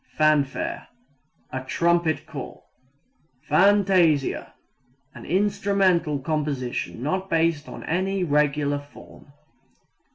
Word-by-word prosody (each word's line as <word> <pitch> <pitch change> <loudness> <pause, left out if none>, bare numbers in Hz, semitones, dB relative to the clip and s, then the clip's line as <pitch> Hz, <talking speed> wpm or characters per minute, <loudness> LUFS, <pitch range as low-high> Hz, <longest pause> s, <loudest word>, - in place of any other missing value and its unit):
Fanfare 155 - +1 0.6
a 130 0 -4
trumpet 170 +3 +1
call. - - -9 0.8
Fantasia 180 -3 +3 0.6
An - - -11
instrumental 190 -4 +1
composition 140 -5 -3
not 185 +6 -2
based 165 -3 +1
on - - -9
any 190 +3 -1
regular 145 -2 +1
form. 145 0 -16
160 Hz, 85 wpm, -24 LUFS, 145-185 Hz, 0.8 s, Fantasia